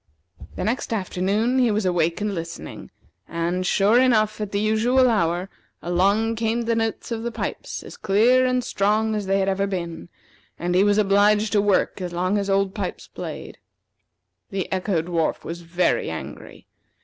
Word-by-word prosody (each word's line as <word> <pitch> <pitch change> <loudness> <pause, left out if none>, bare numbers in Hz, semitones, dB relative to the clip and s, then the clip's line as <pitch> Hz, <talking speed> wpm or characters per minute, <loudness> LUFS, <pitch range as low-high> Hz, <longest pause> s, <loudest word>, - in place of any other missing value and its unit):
The - - -3
next 230 +6 -2
afternoon 205 +5 0
he 245 -2 +4
was 210 -1 0
awake 170 0 +1
and 210 -1 -1
listening, 165 -1 -7 0.4
and, 170 +2 -2
sure 205 +6 +4
enough, 215 -4 +2
at 210 -1 -4
the 200 - 0
usual 225 +5 +3
hour, 180 -5 +1 0.3
along 200 +6 +1
came 230 +1 0
the 230 0 0
notes 225 +1 -2
of 225 -1 -2
the 235 +1 -3
pipes - - -5
as - - -11
clear 235 +6 +3
and 255 -1 +1
strong 215 +2 +1
as 210 -2 -3
they 195 0 +2
ever 195 0 0
had 200 - 0
been; 170 -3 -5 0.5
and 175 +1 -2
he 185 +2 +4
was 205 0 +3
obliged 210 +1 +3
to 205 - +3
work 200 -1 +1
as 180 -1 -4
long 185 +4 0
as 200 0 -3
Old 195 0 +1
Pipes - - -5
played. - - -8 0.9
The 195 -2 -4
Echo 185 -3 0
dwarf 165 -2 -1
was 170 +1 -6
very 175 +2 0
angry. 80 - -8
200 Hz, 175 wpm, -23 LUFS, 180-220 Hz, 0.9 s, he